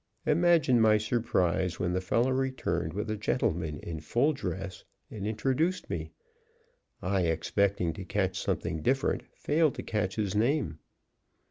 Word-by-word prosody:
Imagine 160 -6 +4
my 110 -1 +6
surprise 95 -6 0
when 90 0 0
the 90 - 0
fellow 115 +7 +1
returned 130 -10 -1
with 100 +5 -3
a - - 0
gentleman 85 - -1
in 80 -2 -5
full 120 - +1
dress 95 - -5 0.3
and 105 -2 -4
introduced 135 - 0
me. - - -3 0.9
I, 95 +1 +1
expecting 90 +2 +1
to 95 - -7
catch 95 0 -1
something 80 - -2
different, 135 - +1
failed 155 -1 +2
to - - -5
catch 95 -3 -1
his 105 -4 -1
name. 110 - +1
105 Hz, 140 wpm, -29 LUFS, 90-130 Hz, 0.9 s, my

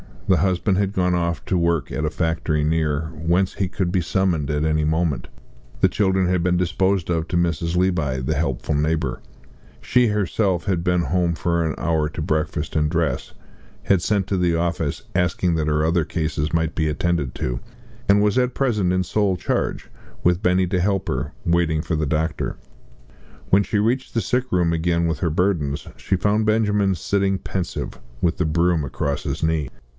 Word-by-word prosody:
The 95 -2 +4
husband 95 +1 +1
had 100 0 0
gone 90 -2 +1
off 85 -1 -1
to 95 - 0
work 85 -4 0
at 80 - -2
a - - +1
factory 80 -2 -1
near, 80 -1 0
whence 85 +4 0
he 95 - 0
could 90 0 -2
be 95 - +2
summoned 85 -4 0
at 75 0 0
any 75 -1 +1
moment; 80 -2 0 0.5
the - - +5
children 95 -2 +1
had 90 -1 +1
been 90 +1 +2
disposed 95 +1 +1
of 80 -1 0
to 85 - -1
Mrs. 85 0 0
Levi, 80 -8 +1
the 65 +5 -1
helpful 75 -1 -1
neighbour; 80 +2 0 0.6
she 125 -1 +3
herself 100 -3 0
had 90 -4 -1
been 90 -1 +2
home 85 +2 0
for 85 0 0
an 80 - -1
hour 80 -1 +1
to 80 +1 -5
breakfast 80 0 -1
and 75 -1 +2
dress, - - -1 0.5
had 95 -3 +3
sent 100 0 +1
to 95 - 0
the 90 -2 +2
office 85 -3 -1
asking 90 0 +1
that 80 -1 0
her 75 0 +2
other 85 -1 +2
cases 75 -2 -2
might 80 -1 +1
be 80 -2 +1
attended 75 -3 -1
to, - - -2 0.5
and 100 +1 +5
was 105 +3 +2
at 125 0 +1
present 105 -9 +1
in 95 0 +1
sole 100 +1 +1
charge, - - -2 0.3
with 90 +1 +3
Benny 90 +1 +3
to 90 +1 0
help 95 +1 0
her, 70 +3 -2
waiting 85 -2 +2
for 80 0 -2
the 75 -1 -1
doctor. 80 +1 -1 0.9
When 100 +2 +5
she 105 - -1
reached 120 +5 0
the 115 - +1
sick 125 +3 0
room 90 -5 +2
again 85 +1 +1
with 80 -4 -2
her 85 - +1
burdens, 80 -4 0
she 95 - -1
found 105 +3 +1
Benjamin 105 -3 +2
sitting 95 +2 0
pensive, 90 -8 -4 0.2
with 85 -1 +1
the 90 - +1
broom 85 0 +2
across 70 +2 -2
his - - -3
knees. 80 -4 0
85 Hz, 190 wpm, -22 LUFS, 80-95 Hz, 0.9 s, the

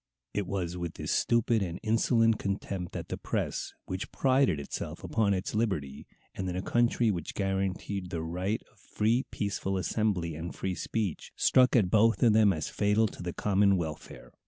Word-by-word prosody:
It 100 -2 -1
was 90 -3 -2
with 85 -2 -4
this - - -4
stupid 115 -1 +2
and 90 -3 -3
insolent 115 0 +3
contempt 95 -2 -3
that - - -6
the - - -4
press, - - -2
which 95 +1 -5
prided 130 - +2
itself 70 - -6
upon 105 -3 +1
its 95 +2 -3
liberty, 90 -12 -2 0.3
and 95 -1 -3
in 90 - -3
a 95 - -2
country 120 0 +2
which 85 -5 -5
guaranteed 95 -1 -2
the 85 -3 -3
right 90 +6 -2
of - - -28
free 115 +5 0
peaceful 100 -2 -2
assembly 95 -4 0
and 80 +3 -6
free 95 - -2
speech, 100 -2 -3
struck 130 0 +4
at 100 -7 +3
both 115 +3 +4
of 115 -3 +6
them 105 -2 +5
as 80 -4 -2
fatal 105 +2 +2
to - - -11
the 90 0 -3
common 100 +1 +3
welfare. 80 -3 -6
100 Hz, 180 wpm, -29 LUFS, 90-110 Hz, 0.3 s, of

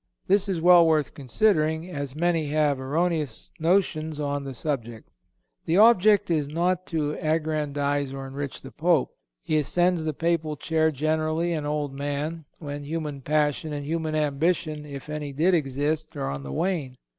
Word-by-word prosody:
This 200 +1 +2
is 185 -3 0
well 175 0 +7
worth 155 -2 +2
considering, 160 - +1
as 140 -4 -5
many 165 -1 +1
have 150 -2 +1
erroneous 150 -1 -1
notions 160 -3 +1
on 145 -1 -2
the 135 -1 -6
subject. 120 -4 -4 0.6
The 165 - +2
object 210 -3 +5
is 150 -3 +1
not 175 +4 0
to 155 -3 -1
aggrandize 145 -3 -1
or 135 0 -6
enrich 140 +1 -6
the 135 - -9
Pope. 165 -3 +2 0.3
He 155 - +1
ascends 175 +3 +1
the 155 -1 -1
Papal 165 -2 0
chair 160 +1 +1
generally 155 +3 0
an 150 -2 -2
old 150 -2 -2
man, 145 +3 -3
when 145 -2 -6
human 150 -2 -4
passion 150 +2 0
and 145 -1 -4
human 160 0 -2
ambition, 150 0 0
if 140 -1 -8
any 150 -2 -5
did 165 +7 +2
exist, 150 +1 -1
are 70 - -2
on 70 0 -5
the 70 0 -7
wane. 145 - -2
155 Hz, 160 wpm, -25 LUFS, 145-165 Hz, 0.6 s, well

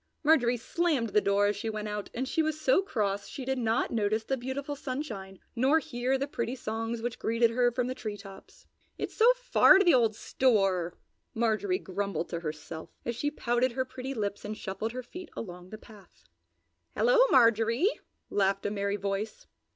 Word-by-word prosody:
Marjorie 250 -6 +4
slammed 285 -1 0
the 210 - +3
door 200 0 +2
as 205 0 +1
she 220 +3 -4
went 215 -1 -4
out 210 -1 -4
and 260 +3 -2
she 320 - +1
was 310 -1 -1
so 290 +4 +3
cross 205 - -2
she 265 - -7
did 265 0 -1
not 225 0 0
notice 215 -1 0
the 270 - -1
beautiful 270 +3 -4
sunshine 250 -9 -5 0.2
nor 265 +6 +4
hear 255 -3 -1
the 275 - -1
pretty 240 -2 -3
songs 225 -1 -4
which 240 -1 -3
greeted 230 +1 +2
her 245 +1 +2
from 250 +1 -1
the 255 - -2
tree 215 -5 -5
tops. 195 -1 -14 0.3
"It's - - -4
so 465 +2 +6
far - - +6
to 390 - +3
the 345 - +6
old 230 -4 +3
store!" 195 -9 +1 0.4
Marjorie 235 - +1
grumbled 200 - -3
to 170 - -3
herself, 160 0 -7 0.2
as 235 - -2
she 290 +5 -1
pouted 245 -3 0
her 260 +1 -1
pretty 260 +1 -6
lips 205 -2 -3
and 210 +1 -5
shuffled 215 +3 -4
her 255 0 -5
feet 360 +9 -9
along 180 -3 -7
the 215 - -8
path. 215 -3 -17 0.7
"Hello, - - +4
Marjorie!" 230 - +4 0.3
laughed 195 0 +1
a 205 - 0
merry 200 0 -1
voice. 200 +2 -4
230 Hz, 190 wpm, -29 LUFS, 205-265 Hz, 0.7 s, so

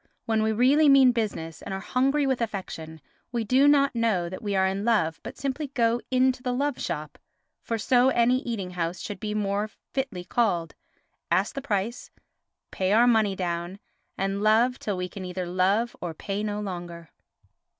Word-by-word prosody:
When 220 -1 +1
we 220 0 +1
really 270 +7 +4
mean 270 -2 +7
business 205 -9 -3
and 195 - -5
are - - -4
hungry 270 +7 +1
with 265 -3 0
affection, 165 -7 -5 0.3
we 235 -2 -1
do 255 +6 +4
not 280 -2 +4
know 220 -7 0
that 185 +4 -7
we 205 -3 -2
are 190 0 +3
in 195 +1 -1
love, 210 -9 +1
but - - -9
simply 280 +2 -3
go 240 -3 +1
into 255 0 +2
the 250 0 -2
love 280 +1 -1
shop—for 160 +7 -6
so 250 +3 +3
any 245 0 +3
eating 220 -8 -4
house 175 0 -3
should 205 -2 -6
be 210 -1 -3
more 205 0 -1 0.2
fitly 260 -10 -3
called—ask 180 -2 -2
the 275 - -4
price, 225 -1 -2 0.6
pay 190 +1 0
our 230 +3 +6
money 220 -5 +3
down, 175 0 -3 0.4
and 195 +1 -1
love 225 +4 +3
till 205 -3 -3
we 180 0 -2
can 190 +1 -8
either 180 0 -4
love 190 +6 +1
or 170 -2 -4
pay 200 +5 -4
no 210 -1 -2
longer. 175 -4 -7
210 Hz, 175 wpm, -26 LUFS, 185-245 Hz, 0.6 s, mean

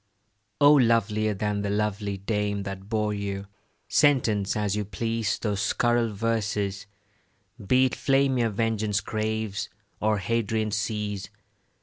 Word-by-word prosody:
O 145 +1 +7
lovelier 110 -5 +3
than 105 +1 -1
the 100 - -2
lovely 105 -1 -1
dame 100 0 -1
That 95 0 -7
bore 105 -2 0
you, 100 -1 -4 0.4
sentence 120 -9 +2
as 105 -1 0
you 105 - -1
please 110 +2 -2
Those 105 -2 -2
scurril 120 0 +1
verses, 105 -2 -1 0.8
be 130 +6 +4
it 130 - -1
flame 135 -2 +2
Your 115 -1 +2
vengeance 110 -1 0
craves, 110 -1 -3 0.3
or 110 0 +2
Hadrian 110 +1 -1
seas. 105 -2 -2
105 Hz, 125 wpm, -26 LUFS, 100-115 Hz, 0.8 s, O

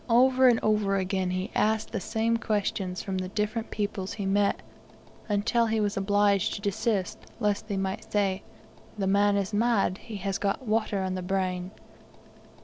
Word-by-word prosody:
Over 255 +2 +5
and 240 -2 +5
over 210 -2 +2
again 190 -1 0
he 185 +1 -2
asked 220 0 +1
the 220 - -2
same 225 +4 0
questions 200 -4 -2
from 190 -1 -2
the 185 - -3
different 210 +4 -2
peoples 200 -2 -3
he 205 -2 -4
met, 200 +1 +1 0.7
until 230 +3 +2
he 220 0 +1
was 205 -1 0
obliged 200 0 +2
to - - -6
desist, 200 -1 -1 0.2
lest 210 0 0
they 200 -3 -2
might 195 +3 -3
say, 195 -2 +1 0.6
"The 195 - -1
man 200 +1 +3
is 200 +1 -2
mad; 210 -3 +2
he 225 -3 -9
has 195 0 -2
got 205 +6 -1
water 215 -2 0
on 185 0 -2
the 185 - -3
brain!" 185 -1 -1
205 Hz, 170 wpm, -27 LUFS, 195-220 Hz, 0.7 s, Over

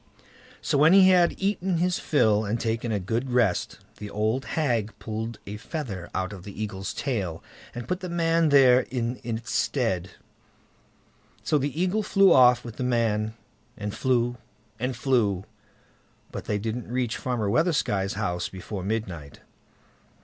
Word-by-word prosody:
So 140 - +1
when 155 +4 +6
he 190 -1 +8
had 180 -2 +4
eaten 190 -2 0
his 180 +1 +1
fill 110 -8 +2
and 110 +3 -2
taken 115 0 -2
a 105 - 0
good 115 +7 -2
rest, 120 -7 +1 0.2
the 105 - -7
old 110 +6 -1
hag 120 -8 0
pulled 110 +1 -5
a 105 +1 -6
feather 110 - -6
out 95 +2 -2
of 95 -3 -10
the 100 +1 -10
Eagle's 100 -3 -4
tail, 95 - -3 0.3
and 120 -1 -6
put 180 - -1
the 185 -1 -6
man 165 -1 +2
there 130 -3 +6
in 125 -1 -3
its 115 -1 -4
stead; 95 -9 0 1.3
so 150 - +2
the 145 +3 -3
Eagle 185 +4 +1
flew 195 -1 +5
off 125 -1 +5
with 115 -2 -8
the - - -2
man, 115 -3 0 0.4
and 105 0 -4
flew, 120 -2 0 0.4
and 125 +2 -2
flew, 105 -8 +1 0.9
but - - -6
they 105 - -1
didn't 110 +2 -4
reach 125 -2 -1
Farmer 120 -5 -2
Weathersky's 105 - +1
house 90 -4 -2
before 95 +1 -7
midnight. 95 -9 -4
120 Hz, 155 wpm, -26 LUFS, 105-140 Hz, 1.3 s, he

